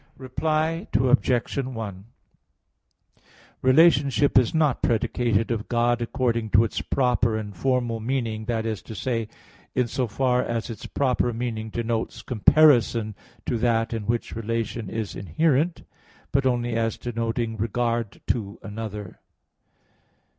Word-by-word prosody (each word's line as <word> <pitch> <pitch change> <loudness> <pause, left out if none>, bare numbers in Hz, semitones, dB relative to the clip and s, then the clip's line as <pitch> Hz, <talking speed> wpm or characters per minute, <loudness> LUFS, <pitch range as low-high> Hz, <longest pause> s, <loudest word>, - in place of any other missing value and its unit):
Reply 155 +7 -1
Obj. 125 -1 +2
1: 110 -7 -5 1.6
Relationship 140 0 +4
is 125 -3 +5
not 155 -5 +1
predicated 115 0 +1
of 110 -2 -2
God 120 0 +2
according 115 -2 -1
to 110 - +7
its 115 - -2
proper 125 -4 +1
and 105 -2 -6
formal 120 +1 0
meaning, 115 -2 -2
that 115 -1 -1
is 110 -2 -2
to 110 - -9
say, 115 0 -2 0.5
in 125 -2 +2
so 125 +1 -1
far 125 +3 +1
as 115 0 -3
its 110 - -8
proper 125 -3 +1
meaning 110 -2 -3
denotes 115 0 -3
comparison 120 -3 +4 0.3
to 120 - -1
that 115 0 +1
in 110 -3 -4
which 120 0 -1
relation 115 -1 -3
is 110 -2 -4
inherent, 155 - +1 0.5
but 135 -1 +2
only 120 -1 0
as 115 -1 0
denoting 115 -1 -2
regard 115 0 -1
to 105 -2 -2
another. 105 -2 -7
120 Hz, 125 wpm, -25 LUFS, 110-130 Hz, 1.6 s, to